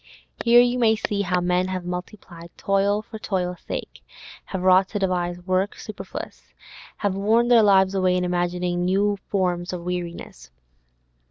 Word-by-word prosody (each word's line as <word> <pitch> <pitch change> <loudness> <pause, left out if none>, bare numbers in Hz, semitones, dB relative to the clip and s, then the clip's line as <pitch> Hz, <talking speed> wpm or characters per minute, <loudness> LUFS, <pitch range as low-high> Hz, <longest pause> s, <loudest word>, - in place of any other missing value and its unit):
Here 240 +1 +7
you 245 +1 +1
may 220 -2 +4
see 205 -1 -2
how 180 -2 0
men 180 +1 +1
have 185 -1 -4
multiplied 180 -1 -7
toil 200 +1 +1
for 220 0 -10
toil's 180 -4 -3
sake, - - -6 0.4
have 190 -2 -5
wrought 185 +1 +5
to 210 - -3
devise 180 -2 -1
work 185 +2 -1
superfluous, - - -9 0.4
have 205 -2 -1
worn 220 +5 +2
their 240 -2 +7
lives 195 -2 +4
away 185 -1 +2
in 180 - 0
imagining 175 0 -1
new 200 +3 +1
forms 180 -2 -1
of 175 -1 -5
weariness. 175 - -6
185 Hz, 155 wpm, -23 LUFS, 180-205 Hz, 0.4 s, Here